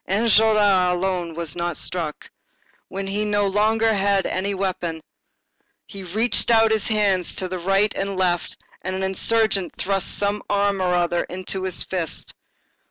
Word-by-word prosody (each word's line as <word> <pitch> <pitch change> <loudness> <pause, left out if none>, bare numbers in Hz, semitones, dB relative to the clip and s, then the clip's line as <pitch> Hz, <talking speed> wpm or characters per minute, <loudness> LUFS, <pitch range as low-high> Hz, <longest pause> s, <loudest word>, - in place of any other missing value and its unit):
Enjolras 210 -3 +4
alone 180 -2 -2
was 170 -3 -4
not 175 -2 -2
struck. 165 -4 -4 0.6
When 195 +1 -5
he 195 +1 -2
had 210 - 0
no 205 -1 +1
longer 215 +3 +2
any 200 -2 +1
weapon, 180 -4 -3 0.9
he 200 -3 -9
reached 215 +8 +1
out 225 -1 +5
his 220 -2 +1
hands 200 -5 +1
to 185 - -3
right 195 +3 +2
and 195 -1 -3
left 175 -2 0 0.2
and 185 +1 -4
an 190 - -3
insurgent 195 0 0
thrust 195 0 -1
some 205 +1 -1
arm 200 -1 +1
or 180 -1 +1
other 175 0 +1
into 185 +1 -5
his 185 -2 -1
fist. 175 -4 -4
195 Hz, 150 wpm, -22 LUFS, 180-205 Hz, 0.9 s, out